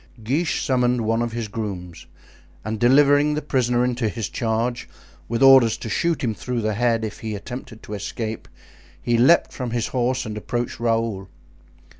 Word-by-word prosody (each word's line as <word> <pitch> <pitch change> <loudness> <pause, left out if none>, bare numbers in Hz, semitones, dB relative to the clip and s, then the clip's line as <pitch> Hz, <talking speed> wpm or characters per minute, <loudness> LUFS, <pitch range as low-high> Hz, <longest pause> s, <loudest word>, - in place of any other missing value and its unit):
Guiche 150 +9 0
summoned 125 -2 +2
one 115 +1 0
of 120 -1 -2
his 115 -2 -3
grooms, 100 -5 -6 0.6
and 110 0 -3
delivering 145 +4 +4
the 150 - -2
prisoner 125 -3 +1
into 120 -3 -1
his 105 -4 -4
charge, 115 +6 -2 0.4
with 115 +3 0
orders 130 -4 +7
to 115 - -7
shoot 165 +8 0
him 115 -3 0
through 120 +4 -3
the 110 0 -1
head 115 0 +1
if 110 - -7
he 110 -1 -4
attempted 115 +1 -8
to 105 - -8
escape, 110 +2 -5 0.5
he 120 - 0
leaped 130 +9 +4
from 125 -2 -4
his 115 -1 -2
horse 130 0 0
and 110 -1 -5
approached 120 +2 -3
Raoul. 115 -4 -1
120 Hz, 170 wpm, -22 LUFS, 110-125 Hz, 0.6 s, orders